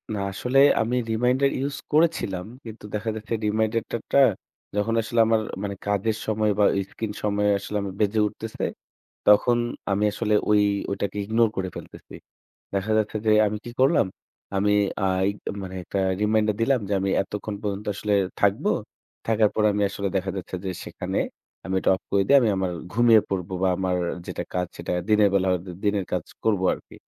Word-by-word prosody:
না, - - -3
আসলে 125 +7 +1 0.2
আমি 120 +3 0 0.2
reminder 125 +4 +2 0.2
use 140 0 -4 0.2
করেছিলাম। 150 - +1 0.2
কিন্তু 110 -1 -9
দেখা 110 +2 -2
যাচ্ছে 110 +1 -5
reminder 110 +2 +1
টা - - 0
টা - - +5 0.6
যখন 105 +2 0
আসলে 115 +1 -2
আমার 110 -1 +3 0.2
মানে 100 -1 -3
কাজের 105 +2 0
সময় 110 -1 +1
বা 105 - +5 0.3
screen 110 -2 -4
সময়ে 105 0 +2
আসলে 105 +1 -4
আমি 100 -1 -4
বেজে 105 +1 +2
উঠতেছে, 110 +1 -7 0.6
তখন 105 +4 +5 0.3
আমি 105 +2 +1
আসলে 105 0 0 0.2
ওই 105 0 +5 0.3
ওটাকে 100 +1 -3
ignore 110 +1 +2
করে 95 -1 -1
ফেলতেছি। - - -11 0.6
দেখা 100 +2 -1
যাচ্ছে 110 0 0
যে 110 - +4 0.2
আমি 105 - -3
কি 120 - -6
করলাম, 130 - +4 0.5
আমি 105 +1 +2 0.3
আ - - +3 0.2
ই - - 0 0.3
মানে 95 0 -7
একটা 100 - -3 0.2
reminder 105 0 +2
দিলাম 130 +1 +3
যে 100 - +1
আমি 95 - -1
এতক্ষণ 105 +1 -5
পর্যন্ত 105 0 -3
আসলে 105 +1 -1 0.3
থাকবো। - - +2 0.6
থাকার 110 -2 +3
পরে 105 -1 +3
আমি 105 - 0
আসলে 100 0 -3
দেখা 95 0 -2
যাচ্ছে 90 0 -5
যে - - -1
সেখানে - - -3 0.5
আমি 95 - -3
এটা - - +1
off 95 - -12
করে 100 -1 +3
দিয়ে 140 - +7
আমি 115 - +3
আমার 95 -1 -1 0.2
ঘুমিয়ে 115 0 +5
পড়বো 95 -1 -3
বা 95 - +4
আমার 95 -1 0 0.3
যেটা - - -4
কাজ 90 -1 -1
সেটা - - -5 0.2
দিনের 105 -1 +5
বেলা 95 -1 +2
হয়তো 90 +1 -2 0.2
দিনের 100 -2 +1
কাজ 90 -3 -1 0.2
করবো 100 -4 +2
আরকি। - - -16
105 Hz, 180 wpm, -24 LUFS, 100-110 Hz, 0.6 s, দিয়ে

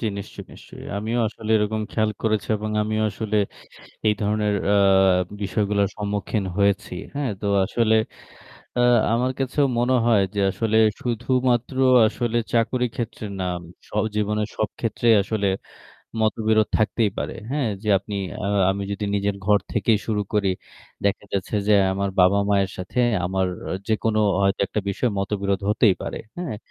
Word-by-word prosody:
জি 115 - -1
নিশ্চয়ই, 100 - -8
নিশ্চয়ই। - - -12
আমিও 110 +4 -2
আসলে 110 0 -7
এরকম 110 +1 0
খেয়াল 110 -1 +1
করেছি 110 -5 0
এবং 110 +1 -4
আমিও 110 0 -1
আসলে 105 +1 -3 0.7
এই 105 - +4
ধরনের 105 0 +1 0.2
আ 105 - +4 0.7
বিষয়গুলোর 100 0 +1
সম্মুখীন 105 0 -2
হয়েছি। 100 -2 +1 0.2
হ্যাঁ 140 -3 -1
তো 105 - -3 0.2
আসলে 110 +2 +1 0.8
আ 125 - +3 0.3
আমার 125 +2 +1
কাছেও 135 +2 +1
মনে 125 +2 +2
হয় 110 -4 +4
যে - - 0
আসলে 110 +1 0 0.2
শুধুমাত্র 125 +1 0 0.3
আসলে 120 +1 -1 0.2
চাকরির 120 +1 +1
ক্ষেত্রে 115 -2 -4 0.2
নাম 90 -1 -2 0.3
স - - -22 0.3
জীবনের 105 0 0
সব 110 - 0
ক্ষেত্রেই 115 0 +2
আসলে 105 0 -1 0.7
মতবিরোধ 110 0 +2
থাকতেই 110 -1 +1
পারে। - - -3 0.2
হ্যাঁ, 140 -5 0
যে 105 - -4
আপনি 105 +1 -8 0.3
আ - - -1 0.2
আমি 100 +1 -2
যদি 100 +1 -3
নিজের 100 0 0
ঘর 105 -1 +5
থেকেই 110 -3 +2
শুরু 105 -2 0
করি 100 -2 +2 0.5
দেখা 100 0 0
যাচ্ছে 100 +2 -2
যে - - +5 0.2
আমার 100 +1 -1
বাবা-মায়ের 100 +1 +3
সাথে 95 +7 -5 0.3
আমার 95 0 0 0.4
যেকোনো 110 0 +1 0.2
হয়তো 100 0 +1
একটা 105 - -2
বিষয়ে 110 +4 0
মতবিরোধ 100 0 -1
হতেই 105 -1 +4
পারে। - - -4 0.2
হ্যাঁ, 170 -11 -4
105 Hz, 150 wpm, -23 LUFS, 100-115 Hz, 0.8 s, ঘর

